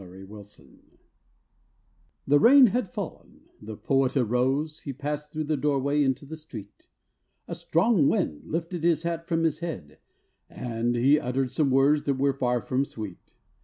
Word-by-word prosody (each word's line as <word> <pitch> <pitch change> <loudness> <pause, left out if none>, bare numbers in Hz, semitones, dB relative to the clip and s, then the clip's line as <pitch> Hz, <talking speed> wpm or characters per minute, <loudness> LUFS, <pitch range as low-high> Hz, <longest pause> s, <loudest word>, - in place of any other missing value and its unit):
THE 95 +1 -12
POET'S 105 0 -13
HAT - - -19 1.6
The 145 +1 +4
rain 265 - +8
had 245 -5 -1
fallen, 205 -8 -8 0.2
the 110 0 -8
Poet 135 0 +1
arose, 135 +6 0
He 140 - -6
passed 150 +2 -5
through 155 0 -3
the 155 +1 -1
doorway 145 0 0
into 135 0 0
the 160 +3 -8
street, 120 -10 -12 0.6
A - - -5
strong 170 -2 +2
wind 75 - -1
lifted 165 +1 -4
his 165 -2 +2
hat 165 0 -3
from 165 0 0
his 155 -2 0
head, 90 - -7 0.5
And 120 0 -2
he 135 +5 +4
uttered 130 0 -2
some 150 -3 +1
words 140 +3 +3
that 140 - +2
were 140 +1 +1
far 125 -2 0
from 130 +1 0
sweet. 105 -9 -9
140 Hz, 165 wpm, -26 LUFS, 125-155 Hz, 1.6 s, rain